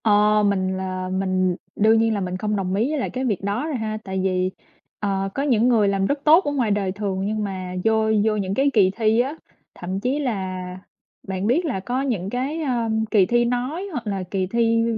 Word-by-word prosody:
Ờ, 210 Hz, 0 st, +4 dB
mình 190 Hz, -2 st, +1 dB
là 185 Hz, -1 st, -4 dB
mình 185 Hz, -1 st, 0 dB, 0.2 s
đương 220 Hz, +2 st, +4 dB
nhiên 225 Hz, 0 st, +2 dB
là 205 Hz, -, -1 dB
mình 180 Hz, 0 st, -3 dB
không 210 Hz, +2 st, -1 dB
đồng 190 Hz, -2 st, -2 dB
ý 225 Hz, +7 st, +1 dB
với 305 Hz, -1 st, -1 dB
lại -, -, -2 dB
cái 260 Hz, +1 st, -3 dB
việc 210 Hz, -7 st, -1 dB
đó 205 Hz, +8 st, -1 dB
rồi 310 Hz, -, -2 dB
ha, 220 Hz, -2 st, -3 dB
tại 190 Hz, -1 st, -3 dB
vì, 185 Hz, -1 st, 0 dB, 0.5 s
ờ, 195 Hz, -1 st, -1 dB
có 275 Hz, -, 0 dB
những 245 Hz, -5 st, +3 dB
người 225 Hz, -5 st, +4 dB
làm 195 Hz, -1 st, +1 dB
rất 285 Hz, +7 st, 0 dB
tốt 320 Hz, +5 st, +6 dB
ở 290 Hz, -, 0 dB
ngoài 250 Hz, -7 st, 0 dB
đời 200 Hz, -2 st, 0 dB
thường 195 Hz, -1 st, -3 dB
nhưng 215 Hz, +1 st, -1 dB
mà 185 Hz, -2 st, -5 dB
vô 220 Hz, 0 st, +2 dB, 0.2 s
vô 220 Hz, -1 st, +2 dB
những 195 Hz, -2 st, -2 dB
cái 275 Hz, +6 st, +2 dB
kỳ 195 Hz, -4 st, +4 dB
thi 220 Hz, 0 st, +2 dB
á, 270 Hz, +5 st, 0 dB, 0.4 s
thậm 185 Hz, +2 st, -4 dB
chí 255 Hz, +7 st, -1 dB
là 190 Hz, -9 st, -3 dB, 0.6 s
bạn 190 Hz, +1 st, -2 dB
biết 305 Hz, +10 st, +2 dB
là 260 Hz, -11 st, -1 dB
có 245 Hz, +7 st, -2 dB
những 220 Hz, -9 st, -2 dB
cái, 270 Hz, +8 st, -2 dB
à, 245 Hz, -6 st, -1 dB, 0.2 s
kỳ 205 Hz, -4 st, +5 dB
thi 240 Hz, +3 st, +2 dB
nói 255 Hz, +10 st, -2 dB
hoặc 245 Hz, -8 st, -5 dB
là 195 Hz, -2 st, -2 dB
kỳ 190 Hz, -2 st, 0 dB
thi 230 Hz, +2 st, +2 dB
210 Hz, 230 wpm, -22 LUFS, 190-245 Hz, 0.6 s, tốt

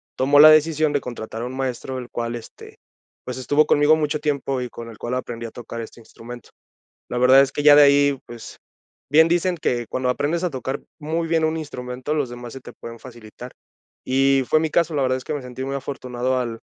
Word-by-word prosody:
tomó 140 Hz, +2 st, +3 dB
la 155 Hz, +1 st, +10 dB
decisión 155 Hz, -1 st, +3 dB
de 145 Hz, -, 0 dB
contratar 115 Hz, -2 st, -7 dB
a -, -, -3 dB
un 130 Hz, +1 st, -7 dB
maestro, 130 Hz, 0 st, -4 dB
el 125 Hz, -1 st, -7 dB
cual, 120 Hz, 0 st, -3 dB
este, 115 Hz, -2 st, -12 dB, 0.5 s
pues, 125 Hz, -, -5 dB
estuvo 145 Hz, +4 st, +2 dB
conmigo 145 Hz, +1 st, +4 dB
mucho 150 Hz, -1 st, -1 dB
tiempo, 140 Hz, -3 st, -2 dB
y 125 Hz, -, -5 dB
con 115 Hz, 0 st, -9 dB
el 115 Hz, -, -13 dB
cual 120 Hz, +1 st, -3 dB
aprendí 120 Hz, -2 st, -5 dB
a -, -, -11 dB
tocar 115 Hz, 0 st, -8 dB
este 115 Hz, -, -11 dB
instrumento. 115 Hz, +1 st, -12 dB, 0.6 s
La 125 Hz, -, -3 dB
verdad 130 Hz, +2 st, +6 dB
es 135 Hz, 0 st, +1 dB
que 145 Hz, -, -3 dB
ya 145 Hz, -1 st, +8 dB
de 150 Hz, -, +8 dB
ahí, 140 Hz, -1 st, +4 dB
pues, 120 Hz, -1 st, -11 dB, 0.5 s
bien 160 Hz, +2 st, +6 dB
dicen 175 Hz, +1 st, 0 dB
que 120 Hz, -6 st, -2 dB
cuando 130 Hz, 0 st, -2 dB
aprendes 145 Hz, +7 st, -1 dB
a 180 Hz, -, +1 dB
tocar 130 Hz, 0 st, -4 dB, 0.2 s
muy 160 Hz, +2 st, -2 dB
bien 165 Hz, -1 st, +1 dB
un 160 Hz, +1 st, 0 dB
instrumento, 130 Hz, -2 st, -5 dB
los 145 Hz, -5 st, -1 dB
demás 120 Hz, -1 st, -9 dB
se 135 Hz, -, -9 dB
te -, -, -11 dB
pueden 115 Hz, 0 st, -10 dB
facilitar. 120 Hz, 0 st, -12 dB, 0.5 s
Y 135 Hz, +1 st, +2 dB
fue 155 Hz, -, +3 dB
mi 160 Hz, 0 st, -1 dB
caso, 165 Hz, 0 st, +1 dB
la 140 Hz, -, 0 dB
verdad 130 Hz, 0 st, +1 dB
es 130 Hz, -, -9 dB
que 155 Hz, -, -3 dB
me 145 Hz, -, -4 dB
sentí 125 Hz, +1 st, -7 dB
muy 135 Hz, +1 st, -4 dB
afortunado 130 Hz, -2 st, -3 dB
al 115 Hz, -2 st, -4 dB
130 Hz, 225 wpm, -22 LUFS, 120-150 Hz, 0.6 s, la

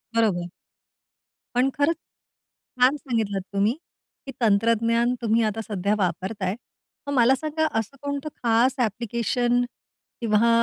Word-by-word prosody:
बरोबर. 185 Hz, -6 st, +1 dB, 1.1 s
पण 255 Hz, +2 st, +3 dB
खरं 290 Hz, +3 st, +3 dB
छान 265 Hz, -4 st, -3 dB
सांगितलत 220 Hz, -8 st, -1 dB
तुम्ही, 200 Hz, +3 st, +2 dB, 0.5 s
की 270 Hz, -, -6 dB
तंत्रज्ञान 230 Hz, +2 st, +3 dB
तुम्ही 230 Hz, 0 st, +2 dB
आता 215 Hz, 0 st, -1 dB
सध्या 200 Hz, 0 st, 0 dB
वापरताय, 190 Hz, +2 st, -1 dB, 0.5 s
मग 285 Hz, -, -1 dB
मला 255 Hz, +1 st, +5 dB
सांगा 310 Hz, +2 st, -1 dB
असं 225 Hz, +5 st, -6 dB
कोणतं 285 Hz, +1 st, -3 dB
खास 240 Hz, +3 st, +3 dB
ॲप्लीकेशन 240 Hz, +2 st, 0 dB, 0.6 s
किंवा 230 Hz, 0 st, +3 dB
230 Hz, 115 wpm, -24 LUFS, 210-255 Hz, 1.1 s, मला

